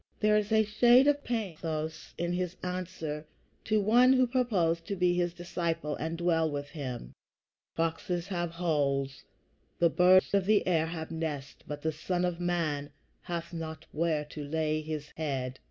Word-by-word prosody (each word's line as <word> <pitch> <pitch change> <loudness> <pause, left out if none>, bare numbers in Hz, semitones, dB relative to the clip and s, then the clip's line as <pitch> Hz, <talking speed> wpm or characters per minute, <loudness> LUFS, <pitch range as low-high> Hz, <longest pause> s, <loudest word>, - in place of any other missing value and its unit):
There 210 0 +4
is 210 0 +1
a 220 0 +5
shade 240 +5 +5
of 290 0 +3
pathos 165 -8 -3
in 175 0 -1
his 180 0 -2
answer 180 -4 -4 0.4
to 215 -1 +2
one 240 +5 +5
who 255 -1 +5
proposed 205 -10 +1
to 200 - -2
be 180 -1 +3
his 175 -1 +1
disciple 170 -3 -2
and 160 +2 -3
dwell 165 -2 +2
with 145 -1 -4
him: 125 - -6 0.6
"Foxes 165 +2 -1
have 175 -3 -1
holes; 145 -5 -1 0.5
the 170 -1 +4
birds 185 +3 +5
of 195 -1 +2
the 210 -1 +4
air 165 -3 +2
have 160 -1 -5
nests; 155 -4 -4
but 145 0 -6
the 160 - +1
Son 175 +3 -1
of 175 -1 -2
man 160 -5 -1 0.3
hath 170 0 -5
not 160 -1 -6
where 155 -1 0
to 150 0 -7
lay 155 +1 0
his 155 -1 -5
head." 135 -4 -3
170 Hz, 165 wpm, -30 LUFS, 155-185 Hz, 0.6 s, a